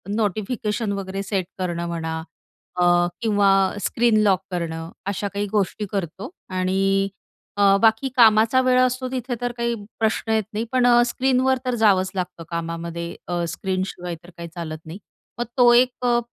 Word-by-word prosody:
Notification 215 +1 -1
वगैरे 195 0 -4
set 195 -2 -1
करणं 170 -2 -2
म्हणा 160 -1 -3 0.6
अ, - - +5 0.4
किंवा 205 -3 +3 0.3
स्क्रीन 235 -2 +2
लॉक 190 -3 +3
करणं, 165 -2 -4 0.2
अशा 200 +1 -2
काही 205 +1 -1
गोष्टी 210 0 0
करतो 195 - -4 0.3
आणि 195 +1 +1 0.5
अ, 200 -1 +5
बाकी 225 +4 +3
कामाचा 225 +1 +5
वेळ 255 0 +3
असतो 255 0 +1
तिथे 250 -1 -3
तर 245 0 -1
काही 235 0 0 0.2
प्रश्न 225 0 0
येत 220 -1 +2
नाही. 215 - -1
पण 255 -1 +3
अ, 240 0 +6
स्क्रीनवर 260 +1 +2
तर 250 - 0
जावंच 195 -5 +3
लागतं 180 -2 -4
कामामध्ये. 170 0 -4
अ, 175 -1 -1
स्क्रीनशिवाय 185 -2 -3
तर 175 - -14
काही 170 - -6
चालत 155 -2 -5
नाही. 160 +3 -8 0.4
मग 240 - 0
तो 245 -1 +7
एक 250 +1 +3
अ, 240 -1 +3
200 Hz, 160 wpm, -22 LUFS, 180-240 Hz, 0.6 s, तो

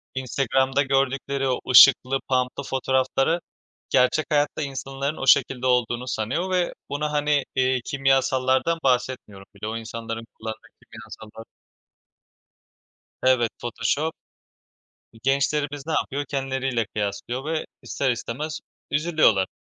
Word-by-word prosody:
Instagram'da 130 +1 +1
gördükleri 135 0 0
o 130 - 0
ışıklı, 135 +1 +7
pump'lı 130 +1 0
fotoğrafları 135 +4 0 0.5
gerçek 125 +5 +3
hayatta 145 +1 +1
insanların 135 +1 -4
o 135 - -4
şekilde 130 -1 +4
olduğunu 125 0 +1
sanıyor 145 - -2
ve 180 -1 +1 0.2
bunu, 150 +1 -2
hani, 145 -1 +1
eee, 130 -1 +2
kimyasallardan 135 +2 +1
bahsetmiyorum 125 -6 -1
bile. 105 +2 -6
O 115 - -3
insanların 115 0 -6
kullandığı 110 +2 -7 0.2
kimyasallar 110 0 -12 1.8
Evet, 130 -3 +3
Photoshop. 145 +6 -1 1.0
E, - - -15
gençlerimiz 140 +1 0
ne 160 - -2
yapıyor? 145 -1 -1
Kendileriyle 130 -4 -1
kıyaslıyor 105 +6 -4
ve 160 +1 -2 0.2
ister 135 - -1
istemez 145 +6 -4 0.3
üzülüyorlar. 150 - +3
130 Hz, 110 wpm, -24 LUFS, 120-140 Hz, 1.8 s, ışıklı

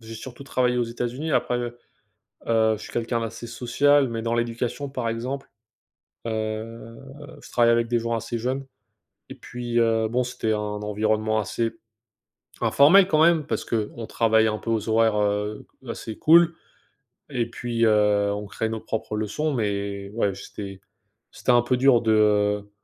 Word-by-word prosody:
j'ai 115 0 -10
surtout 120 +4 -9
travaillé 125 -2 0
aux 120 - +2
États-Unis 120 +6 -4
après, 125 - +1
heu 120 0 -5 0.7
heu 110 -1 +3
je 105 - -12
suis - - -10
quelqu'un 120 0 -1
d'assez 115 +1 -6
social, 135 +4 +2
mais 115 -1 -4
dans 115 0 -1
l'éducation 120 +4 -2
par 130 -4 -3
exemple, 125 +5 -4 0.8
heu, 110 +1 -4 0.4
je - - -14
travaillais 115 -1 +4
avec 115 0 +1
des 120 0 +1
gens 115 0 -2
assez 115 +1 -3
jeunes 130 +4 -2 0.6
et - - -9
puis, 120 -1 -4
heu, 115 -1 +2
bon, 125 +3 0
c'était 115 -2 -2
un - - -1
environnement 105 +1 -1
assez 115 +2 -1 0.9
informel 180 +7 +6
quand 155 -4 +3
même. 165 -2 +4
Parce - - -2
qu'on 115 0 -3
travaille 110 0 +2
un 110 -1 0
peu - - -6
aux 115 -1 -1
horaires, 110 -1 +3
heu, 105 +1 -1 0.2
assez 115 -1 -6
cool 170 +1 +6 0.8
et 125 -5 -1
puis, 115 -1 -1
heu, 105 -2 +3
on 105 0 -4
crée 110 +2 -3
nos 110 0 -4
propres 110 0 -4
leçons 110 +9 -1
mais 100 -4 -2
ouais, 100 -4 0
c'était 100 0 -8 0.5
c'était - - 0
un 120 0 +5
peu 125 +1 +1
dur 125 -2 +5
de, 115 - 0
heu, 105 -1 +2
115 Hz, 170 wpm, -24 LUFS, 110-120 Hz, 0.9 s, informel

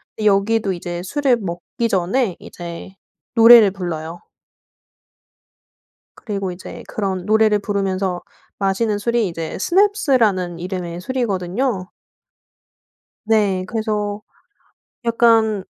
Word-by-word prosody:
근데 215 - -4
여기도 205 +1 +2
이제 175 -1 -5
술을 275 +5 +1
먹기 190 +4 -4
전에 195 +2 0
이제 170 +1 -9 0.4
노래를 230 -3 +8
불러요. 170 -3 -5 2.0
그리고 195 -4 -4
이제 175 +1 -9
그런 190 -3 -3
노래를 215 0 +4
부르면서 195 -3 -2 0.4
마시는 205 +2 0
술이 235 0 0
이제 165 -2 -5
스냅스라는 255 - +2
이름의 175 -1 -5
술이거든요. 200 -2 -2 1.3
네. 205 -4 +1
그래서 210 -2 -2 0.9
약간 225 -3 +3
200 Hz, 230 characters per minute, -20 LUFS, 185-225 Hz, 2.0 s, 노래를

